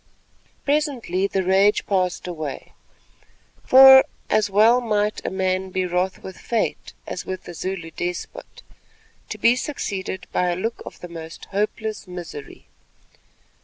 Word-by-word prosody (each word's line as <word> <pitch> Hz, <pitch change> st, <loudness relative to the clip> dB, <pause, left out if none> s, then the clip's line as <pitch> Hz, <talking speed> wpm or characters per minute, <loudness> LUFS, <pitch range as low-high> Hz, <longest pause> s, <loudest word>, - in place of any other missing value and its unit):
Presently 270 Hz, -, 0 dB
the 195 Hz, -1 st, -1 dB
rage 195 Hz, +3 st, +3 dB
passed 185 Hz, -3 st, 0 dB
away—for 255 Hz, -, +3 dB, 0.3 s
as 215 Hz, -1 st, +2 dB
well 220 Hz, +5 st, +5 dB
might 210 Hz, -2 st, -1 dB
a -, -, -2 dB
man 190 Hz, 0 st, -1 dB
be 185 Hz, 0 st, -1 dB
wroth 180 Hz, +1 st, -1 dB
with 190 Hz, -, -9 dB
fate 230 Hz, -2 st, -2 dB
as -, -, -5 dB
with 185 Hz, 0 st, -6 dB
a 175 Hz, -, -7 dB
Zulu 170 Hz, -1 st, -5 dB
despot—to 440 Hz, -, -9 dB
be 235 Hz, +1 st, +4 dB
succeeded 195 Hz, -9 st, -4 dB
by 180 Hz, -, +1 dB
a 175 Hz, -, 0 dB
look 225 Hz, +6 st, -3 dB
of -, -, -11 dB
the 175 Hz, -, -7 dB
most 165 Hz, -1 st, -9 dB
hopeless 210 Hz, +1 st, -2 dB
misery. 175 Hz, -6 st, -9 dB
190 Hz, 130 wpm, -22 LUFS, 180-220 Hz, 0.3 s, well